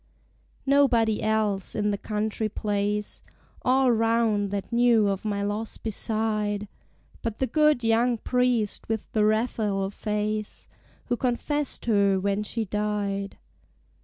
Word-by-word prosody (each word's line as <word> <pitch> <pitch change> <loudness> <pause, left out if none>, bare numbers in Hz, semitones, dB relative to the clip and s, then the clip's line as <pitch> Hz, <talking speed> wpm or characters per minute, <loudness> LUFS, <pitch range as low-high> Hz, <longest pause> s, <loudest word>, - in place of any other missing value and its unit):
Nobody 250 -6 +3
else, 215 -3 0
in 210 -1 +1
the 200 - -1
country 215 +1 -2
place 205 0 -2 0.4
All 260 0 +3
round, 225 -3 +2
that 200 +3 -4
knew 235 -3 +4
of 195 -1 -1
my 205 -2 -1
loss 210 +2 -3
beside, 215 -1 -1 0.5
But 225 -2 -3
the 265 - +1
good 300 0 +3
young 230 +2 +2
Priest 245 -4 0
with 220 -1 -3
the 215 - +2
Raphael 215 -3 0
face, 210 0 -3 0.4
Who 245 - 0
confessed 270 +4 -1
her 200 -4 +3
when 200 +1 0
she 220 +1 -2
died. 205 -1 -2
215 Hz, 125 wpm, -26 LUFS, 205-235 Hz, 0.5 s, knew